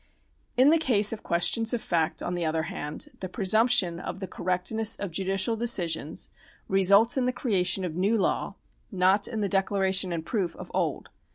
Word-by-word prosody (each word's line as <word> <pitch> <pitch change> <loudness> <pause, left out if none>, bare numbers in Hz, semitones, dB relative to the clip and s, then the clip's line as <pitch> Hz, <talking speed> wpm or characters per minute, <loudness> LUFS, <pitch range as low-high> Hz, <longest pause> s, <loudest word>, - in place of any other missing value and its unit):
In 265 +4 +6
the 330 - +4
case 220 -8 +4
of 220 - -7
questions 225 +7 +1
of - - -2
fact, 160 -1 -1
on 175 - -3
the 175 -1 -2
other 160 0 -1
hand, 155 -4 -5
the 185 - -5
presumption 200 -2 +1
of 180 +1 -6
the 195 - -4
correctness 185 +5 -1
of 200 -3 -5
judicial 195 +5 0
decisions 175 -9 -1 0.4
results 200 +6 +4
in 255 - +1
the 250 - +1
creation 190 -6 -1
of 170 - -4
new 195 +7 +1
law, 200 - -1 0.4
not 190 +1 +3
in 225 -3 -4
the 200 - 0
declaration 190 -1 +1
and 165 -1 -4
proof 190 -6 -2
of - - -10
old. - - -2
195 Hz, 180 wpm, -27 LUFS, 180-220 Hz, 0.4 s, In